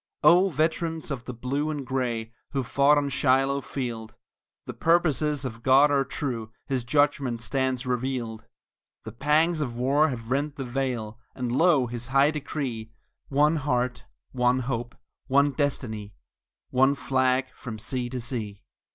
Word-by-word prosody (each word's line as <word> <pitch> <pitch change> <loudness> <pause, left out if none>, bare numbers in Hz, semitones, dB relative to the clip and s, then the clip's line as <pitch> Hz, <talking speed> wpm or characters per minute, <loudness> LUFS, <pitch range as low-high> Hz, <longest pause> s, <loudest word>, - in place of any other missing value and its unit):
Oh, 180 +3 +6
veterans 160 0 -1
of 125 -3 -4
the 125 - -5
Blue 140 +6 -2
and 145 -3 -4
Gray, 120 -4 -2 0.2
who 135 -2 0
fought 140 +4 +4
on 145 -1 +1
Shiloh 135 +1 +2
field, 120 -5 -5 0.5
The - - -6
purposes 155 -4 +2
of 115 -3 -6
God 135 +4 +5
are 140 -1 +3
true, 125 -5 -4
His 130 -3 -1
judgment 140 -2 +1
stands 130 +1 -1
revealed; 125 -3 -2 0.6
The 110 - -7
pangs 155 +7 +2
of 120 -5 -3
war 140 +5 +3
have 115 -2 -6
rent 145 +2 0
the 135 -3 -5
veil, 120 -3 -3 0.2
and 125 -2 -3
lo, 150 -1 +4
His 120 0 -5
high 135 +3 +4
decree: 135 -7 -4 0.4
One 150 +3 +3
heart, 125 -4 -1 0.3
one 125 0 +2
hope, 120 -1 -3 0.3
one 140 +2 +4
destiny, 110 -8 -3 0.6
one 135 +2 +4
flag 130 -1 +1
from 115 -3 -7
sea 120 +3 -3
to 125 0 -4
sea. 110 -4 -5
130 Hz, 150 wpm, -26 LUFS, 120-145 Hz, 0.6 s, Oh